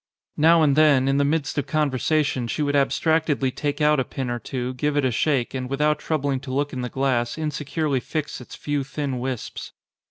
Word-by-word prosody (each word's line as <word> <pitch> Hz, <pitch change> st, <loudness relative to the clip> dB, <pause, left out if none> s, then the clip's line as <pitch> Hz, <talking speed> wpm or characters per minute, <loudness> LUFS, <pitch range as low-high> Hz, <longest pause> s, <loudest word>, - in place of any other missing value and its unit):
Now 165 Hz, +2 st, +5 dB
and 140 Hz, -3 st, +3 dB
then, 145 Hz, -4 st, +5 dB
in 135 Hz, 0 st, +2 dB
the 140 Hz, -, +3 dB
midst 145 Hz, 0 st, 0 dB
of 145 Hz, -, -3 dB
conversa 150 Hz, 0 st, +1 dB
tion, 125 Hz, -3 st, -2 dB
she 150 Hz, -, -1 dB
would 145 Hz, 0 st, 0 dB
abstractedly 145 Hz, -1 st, +1 dB
take 145 Hz, +3 st, -3 dB
out 150 Hz, -1 st, +4 dB
a -, -, +2 dB
pin 125 Hz, 0 st, -4 dB
or 120 Hz, -, -2 dB
two, 125 Hz, +2 st, -4 dB
give 145 Hz, +3 st, -1 dB
it 145 Hz, -, +2 dB
a 130 Hz, -, +2 dB
shake, 130 Hz, +1 st, 0 dB
and 130 Hz, -1 st, -4 dB
without 150 Hz, +2 st, +1 dB
troubling 140 Hz, -4 st, -1 dB
to 130 Hz, 0 st, -8 dB
look 145 Hz, +2 st, -1 dB
in 130 Hz, -, -3 dB
the 125 Hz, -, -3 dB
glass 130 Hz, -2 st, 0 dB
insecurely 150 Hz, -2 st, -1 dB
fix 150 Hz, +1 st, -4 dB
its 125 Hz, -, -10 dB
few 145 Hz, -1 st, -2 dB
thin 135 Hz, -1 st, -3 dB
wisps. 130 Hz, -2 st, -5 dB
140 Hz, 215 wpm, -23 LUFS, 130-150 Hz, -, Now